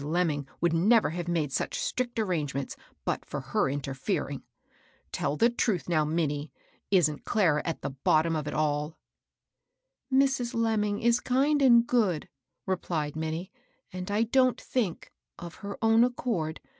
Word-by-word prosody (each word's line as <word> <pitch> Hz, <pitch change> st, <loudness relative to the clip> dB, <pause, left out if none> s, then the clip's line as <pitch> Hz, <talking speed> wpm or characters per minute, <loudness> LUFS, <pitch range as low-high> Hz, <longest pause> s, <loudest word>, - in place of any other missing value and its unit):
Lemming 150 Hz, -2 st, 0 dB
would 170 Hz, -1 st, +2 dB
never 210 Hz, +4 st, +4 dB
have 175 Hz, +1 st, -4 dB
made 160 Hz, -5 st, 0 dB
such -, -, -2 dB
strict 245 Hz, -2 st, -2 dB
arrangements 150 Hz, -10 st, -2 dB, 0.3 s
but -, -, -1 dB
for -, -, -5 dB
her -, -, 0 dB
interfering. 135 Hz, -1 st, -3 dB, 0.7 s
Tell 150 Hz, -, -1 dB
the. 235 Hz, +1 st, +4 dB
truth 220 Hz, -6 st, 0 dB
now, 165 Hz, -3 st, +2 dB
Minnie, 150 Hz, -2 st, -1 dB, 0.2 s
— -, -, -36 dB
isn't 160 Hz, -6 st, +2 dB
Clara 170 Hz, -10 st, +2 dB
at 165 Hz, -, -3 dB
the -, -, -2 dB
bottom 155 Hz, +4 st, +2 dB
of 155 Hz, -2 st, -2 dB
itaU?" 150 Hz, +1 st, -1 dB, 1.2 s
"Mrs. 265 Hz, -2 st, +2 dB
Lemming 215 Hz, -3 st, 0 dB
is 235 Hz, 0 st, +4 dB
kind 280 Hz, +4 st, +2 dB
and 240 Hz, -3 st, +6 dB
good," 210 Hz, -11 st, +1 dB, 0.4 s
replied 165 Hz, -6 st, -2 dB
Minnie; 160 Hz, +3 st, -4 dB, 0.2 s
" 260 Hz, -, -36 dB
and 185 Hz, +1 st, -5 dB
I 210 Hz, +2 st, +2 dB
don't 255 Hz, +2 st, +3 dB
think, 220 Hz, -10 st, -2 dB, 0.3 s
of 170 Hz, -2 st, -8 dB
her 200 Hz, 0 st, -6 dB
own 225 Hz, +1 st, +5 dB
accord. 230 Hz, -10 st, -1 dB
175 Hz, 150 wpm, -28 LUFS, 155-230 Hz, 1.2 s, and